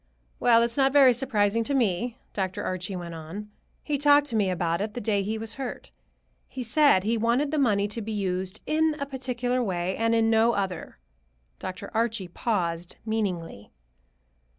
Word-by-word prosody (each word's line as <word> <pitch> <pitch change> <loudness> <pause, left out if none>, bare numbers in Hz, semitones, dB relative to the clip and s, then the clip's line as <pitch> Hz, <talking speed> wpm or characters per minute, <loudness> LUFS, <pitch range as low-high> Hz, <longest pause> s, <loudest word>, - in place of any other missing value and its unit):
"Well, 235 -1 +5
it's 235 +1 -1
not 270 -1 +4
very 270 -3 +7
surprising 230 -3 +1
to 280 - 0
me," 235 0 0 0.2
Dr. 190 -2 -2
Archie 185 +1 -3
went 175 -2 -6
on. 170 +7 -8 0.3
"He 290 -2 -1
talked 290 0 +5
to - - -2
me 205 -3 +2
about 170 -1 -1
it 210 +1 -4
the - - -2
day 205 -3 0
he 215 +3 -2
was 225 0 -5
hurt. 255 - -6 0.6
He 255 - -6
said 245 -4 +4
he 225 +2 0
wanted 240 +6 +1
the 310 - 0
money 205 -6 +2
to 225 +2 -4
be 220 +1 -5
used 190 -1 -2
in 315 0 +2
a 280 - -3
particular 255 -2 -2
way, 185 -4 -1
and 230 +1 +1
in 225 0 +3
no 225 +1 +4
other." 195 -3 -3 0.6
Dr. 185 +2 -6
Archie 225 -5 -1
paused 175 -4 -2
meaningly. 185 - -3
220 Hz, 175 wpm, -26 LUFS, 190-245 Hz, 0.6 s, very